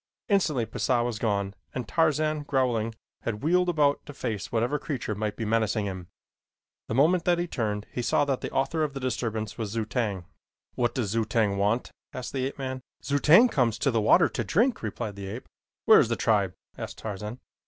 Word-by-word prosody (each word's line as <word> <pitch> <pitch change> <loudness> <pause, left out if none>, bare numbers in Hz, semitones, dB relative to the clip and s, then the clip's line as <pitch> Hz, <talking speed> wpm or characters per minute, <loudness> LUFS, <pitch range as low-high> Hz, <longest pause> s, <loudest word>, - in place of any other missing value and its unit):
Instantly 155 - +2
Pisah 120 +1 0
was 120 -2 -3
gone 100 -4 0 0.2
and 125 -3 -3
Tarzan, 155 - +1
growling, 125 -6 0 0.3
had 105 0 -4
wheeled 180 +3 +3
about 145 -4 +2
to 145 - -9
face 110 -9 -4
whatever 120 +6 +1
creature 130 -8 -3
might 105 0 -3
be 115 - -3
menacing 110 -1 +1
him. 95 -3 -5 0.8
The 110 - -2
moment 165 +6 +4
that 175 -1 +3
he 175 - 0
turned 105 -9 -2
he 125 - -3
saw 145 - +2
that 135 -2 -1
the - - -3
author 145 +4 0
of 145 -2 -2
the - - -3
disturbance 115 -4 -3
was 110 -2 -2
Zu 110 +1 -2
tag. 105 -6 -2 0.5
"What 120 -1 0
does 110 -7 -1
Zu 115 0 +1
tag 110 -2 +1
want?" 105 +5 0 0.2
asked 130 - -6
the 130 -1 0
ape 135 - -8
man. 130 -1 -4 0.2
"Zu 145 0 0
tag 190 - +7
comes 115 -4 +2
to 135 +3 +1
the 115 -2 +1
water - - +5
to - - -3
drink," 230 - +2
replied 110 -1 -4
the 100 -1 -6
ape. 110 +6 -7 0.4
"Where - - +8
is - - +3
the - - +1
tribe?" - - +1 0.2
asked - - -6
Tarzan. 105 +3 -6
120 Hz, 205 wpm, -27 LUFS, 110-145 Hz, 0.8 s, Where